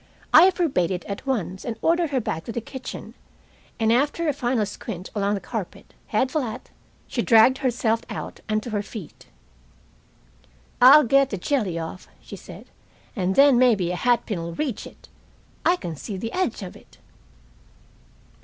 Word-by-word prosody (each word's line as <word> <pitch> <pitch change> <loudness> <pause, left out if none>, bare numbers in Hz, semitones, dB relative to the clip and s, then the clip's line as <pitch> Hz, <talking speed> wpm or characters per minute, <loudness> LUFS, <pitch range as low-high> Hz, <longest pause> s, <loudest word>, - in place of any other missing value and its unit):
I 340 +5 +9
forbade 320 - 0
it 180 -2 -4
at 200 +6 -7
once, 190 -8 -2
and 230 -2 -4
ordered 335 +2 +2
her 270 -2 0
back 160 -8 -3
to - - -5
the 235 - -3
kitchen, 260 +3 -8 0.7
and 225 0 +3
after 290 +6 +1
a 300 - +2
final 240 -4 0
squint 190 -2 -7
along 205 0 0
the - - -3
carpet, 195 0 -7
head 255 +5 0
flat, 255 -5 -4 0.3
she - - -2
dragged 245 +2 +5
herself 235 -4 0
out - - -6
and 215 0 0
to 240 - -7
her 205 -1 -1
feet. 215 +1 -10 1.5
"I'll 280 +5 +9
get 275 +2 +3
the 200 - -3
jelly 200 - -1
off," 165 +2 -7
she - - -10
said, - - -12 0.5
"and 190 -3 -1
then 275 -3 +6
maybe 215 -9 +3
a - - -2
hat 240 +6 +1
pin'll 170 -5 -4
reach 270 - -3
it. - - -17 0.6
I 350 - +4
can 170 - -6
see 195 +7 -6
the 225 +4 -5
edge 365 - -1
of 180 - -8
it." - - -18
230 Hz, 170 wpm, -24 LUFS, 195-270 Hz, 1.5 s, I